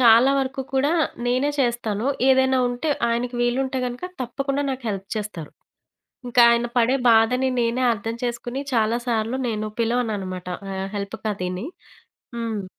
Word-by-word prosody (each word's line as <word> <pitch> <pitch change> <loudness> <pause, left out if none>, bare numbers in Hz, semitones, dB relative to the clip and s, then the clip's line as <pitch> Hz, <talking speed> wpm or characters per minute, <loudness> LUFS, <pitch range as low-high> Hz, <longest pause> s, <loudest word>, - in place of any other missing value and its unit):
చాలా 235 +2 +7
వరకు 265 0 -3
కూడా, 280 +4 +2 0.3
నేనే 255 +4 +2
చేస్తాను. 235 -2 0 0.2
ఏదైనా 265 0 +4
ఉంటే, 245 +5 -2 0.2
ఆయనకి 240 +1 -1
వీలుంటే 260 +2 0
గనక 245 +6 -5 0.2
తప్పకుండా 275 +3 -2
నాకు 260 -2 -5
హెల్ప్ 195 0 -5
చేస్తారు. 205 -8 -5 0.8
ఇంకా 245 0 +5
ఆయన 235 0 +2
పడే 245 +3 +3
బాధని 240 +4 +4
నేనే 235 +2 0
అర్థం 225 +1 -4
చేసుకొని, 240 +3 -3
చాలా 225 +1 +2
సార్లు 230 +2 0
నేను 215 -1 -2
పిలవననమాట. 210 -6 -1 0.3
ఆహ్, 190 0 -3
హెల్ప్‌కదీని. 200 -1 -3 0.7
హ్మ్. 225 -3 -3
235 Hz, 130 wpm, -23 LUFS, 215-255 Hz, 0.8 s, చాలా